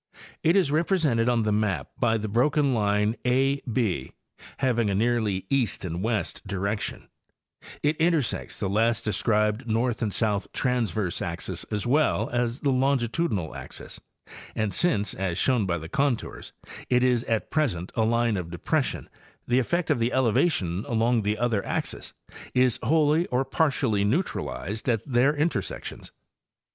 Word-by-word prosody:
It 165 Hz, +3 st, +3 dB
is 185 Hz, -8 st, +3 dB
represented 150 Hz, -8 st, +2 dB
on 120 Hz, -2 st, +2 dB
the 105 Hz, -, +1 dB
map 105 Hz, -3 st, 0 dB
by 115 Hz, -3 st, +2 dB
the 110 Hz, 0 st, -3 dB
broken 135 Hz, +5 st, +2 dB
line 105 Hz, 0 st, +1 dB
4 135 Hz, +3 st, +2 dB
B, 105 Hz, -, -1 dB, 0.4 s
haying 120 Hz, -5 st, +1 dB
a 100 Hz, -, 0 dB
nearly 110 Hz, -3 st, 0 dB
east 125 Hz, -9 st, 0 dB
and 85 Hz, 0 st, -3 dB
west 110 Hz, -1 st, -1 dB
direction; 100 Hz, +2 st, -3 dB, 0.8 s
it 150 Hz, +1 st, +2 dB
intersects 160 Hz, -6 st, 0 dB
the -, -, -1 dB
last 115 Hz, +3 st, +1 dB
described 105 Hz, +3 st, +1 dB
north 115 Hz, +2 st, 0 dB
and 110 Hz, -3 st, 0 dB
south 105 Hz, -1 st, 0 dB
transverse 110 Hz, -7 st, -1 dB
axis 85 Hz, -1 st, -4 dB
as 105 Hz, +1 st, -3 dB
well 145 Hz, +5 st, +2 dB
as 120 Hz, +1 st, -1 dB
the 140 Hz, -, +2 dB
longitudinal 130 Hz, -, 0 dB
axes, -, -, -8 dB, 0.5 s
and 110 Hz, -3 st, -1 dB
since, 105 Hz, -, +1 dB
as 90 Hz, -2 st, -2 dB
shown 120 Hz, -5 st, +2 dB
by 85 Hz, -1 st, 0 dB
the 80 Hz, 0 st, -7 dB
contours, 135 Hz, -, -1 dB, 0.4 s
it 125 Hz, 0 st, +3 dB
is 125 Hz, -2 st, +2 dB
at 110 Hz, -1 st, -1 dB
present 105 Hz, -, 0 dB
a 115 Hz, -, +1 dB
line 115 Hz, -1 st, +2 dB
of 90 Hz, -2 st, -4 dB
depres 85 Hz, -1 st, 0 dB
sion -, -, -6 dB, 0.4 s
the 125 Hz, +1 st, +3 dB
effect 170 Hz, +7 st, 0 dB
of -, -, +2 dB
the 115 Hz, +2 st, +1 dB
elevation 110 Hz, -, +1 dB
along 115 Hz, 0 st, +2 dB
the 105 Hz, +1 st, -1 dB
other 115 Hz, -3 st, 0 dB
axes -, -, -3 dB, 0.4 s
is 125 Hz, -2 st, +3 dB
wholly 155 Hz, +5 st, +3 dB
or 125 Hz, +2 st, 0 dB
partially 130 Hz, -7 st, +1 dB
neutralized 110 Hz, -, -2 dB
at 115 Hz, -3 st, 0 dB
their 135 Hz, +2 st, +3 dB
intersections. 145 Hz, -, -3 dB
115 Hz, 155 wpm, -26 LUFS, 105-135 Hz, 0.8 s, It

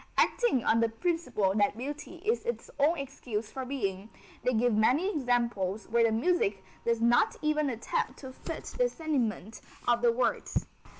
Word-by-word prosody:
Acting 465 Hz, -, +3 dB
on 230 Hz, -, +4 dB
the 230 Hz, 0 st, +3 dB
principle 245 Hz, -, 0 dB
that 205 Hz, 0 st, +2 dB
beauty 295 Hz, +7 st, -6 dB
is 450 Hz, +3 st, +1 dB
its 475 Hz, 0 st, -4 dB
own 310 Hz, +5 st, +4 dB
excuse 245 Hz, -6 st, -4 dB
for 265 Hz, -1 st, -5 dB
being, 205 Hz, -6 st, -3 dB, 0.3 s
they 250 Hz, -, +2 dB
give 240 Hz, +1 st, +3 dB
many 260 Hz, -, +3 dB
examples 235 Hz, -7 st, 0 dB
where 235 Hz, +1 st, +3 dB
the 225 Hz, -, +3 dB
music 220 Hz, -, +1 dB, 0.2 s
does 235 Hz, -1 st, +1 dB
not 235 Hz, +1 st, +4 dB
even 305 Hz, -1 st, +2 dB
attempt 260 Hz, -, -2 dB
to 260 Hz, -2 st, -9 dB
fit -, -, -6 dB, 0.2 s
the -, -, +4 dB
sentiment 235 Hz, -, -2 dB, 0.3 s
of 240 Hz, -1 st, +3 dB
the 240 Hz, -1 st, +5 dB
words. 245 Hz, +2 st, 0 dB
245 Hz, 165 wpm, -30 LUFS, 225-300 Hz, 0.3 s, the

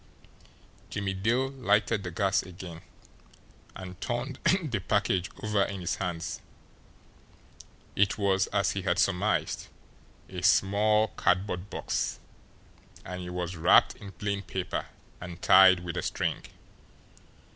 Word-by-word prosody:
Jimmie 100 Hz, -2 st, -2 dB
Dale 120 Hz, +7 st, +1 dB
lighted 110 Hz, -5 st, +1 dB
the 90 Hz, -, -5 dB
gas 95 Hz, +3 st, +1 dB
again, 90 Hz, -3 st, -10 dB, 0.9 s
and 95 Hz, -1 st, -9 dB
turned 120 Hz, +3 st, -3 dB, 0.2 s
the 120 Hz, -9 st, -2 dB
package 95 Hz, -2 st, 0 dB
over 105 Hz, -2 st, +1 dB
in 100 Hz, -1 st, -5 dB
his 90 Hz, 0 st, -2 dB
hands. 85 Hz, -2 st, -4 dB, 1.5 s
It 100 Hz, 0 st, +2 dB
was, 95 Hz, -2 st, +2 dB
as 100 Hz, +1 st, +1 dB
he 100 Hz, -, -3 dB
had 90 Hz, -1 st, 0 dB
surmised, 100 Hz, +1 st, 0 dB, 0.6 s
a 90 Hz, -1 st, -6 dB
small 105 Hz, +4 st, +3 dB
cardboard 90 Hz, +1 st, 0 dB
box; -, -, -2 dB, 0.9 s
and 90 Hz, 0 st, -6 dB
it 90 Hz, -, -6 dB
was 90 Hz, 0 st, -4 dB
wrapped 85 Hz, 0 st, +5 dB
in 100 Hz, -2 st, -10 dB
plain 100 Hz, +2 st, -3 dB
paper 95 Hz, -1 st, -4 dB, 0.3 s
and 90 Hz, -1 st, -8 dB
tied 95 Hz, -1 st, +7 dB
with 90 Hz, -1 st, -5 dB
a -, -, -1 dB
string. -, -, -2 dB
95 Hz, 125 wpm, -28 LUFS, 90-105 Hz, 1.5 s, tied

